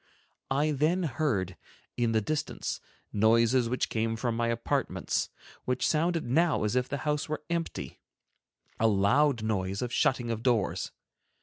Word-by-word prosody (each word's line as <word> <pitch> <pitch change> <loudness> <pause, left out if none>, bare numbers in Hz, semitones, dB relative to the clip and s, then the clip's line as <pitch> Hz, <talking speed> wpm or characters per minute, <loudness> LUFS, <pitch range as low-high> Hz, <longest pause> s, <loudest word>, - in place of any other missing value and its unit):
I 145 +3 +2
then 155 +6 +1
heard, 125 - -1 0.4
in 120 -2 +1
the 110 -1 +2
distance, 150 +7 -3 0.3
noises 115 +3 +4
which 125 - 0
came 115 0 -1
from 115 0 -1
my 115 0 0
apartments, 115 0 -1 0.4
which 125 0 +1
sounded 165 +1 +1
now 160 +4 +2
as 105 +3 0
if 125 0 +1
the 140 - -2
house 150 0 0
were 155 0 -3
empty, 170 -1 -3 0.8
a 115 - +4
loud 115 +5 +3
noise 100 -1 -1
of 120 -1 -4
shutting 120 -3 +1
of 115 -1 -3
doors. 105 -8 +1
120 Hz, 145 wpm, -29 LUFS, 110-150 Hz, 0.8 s, noises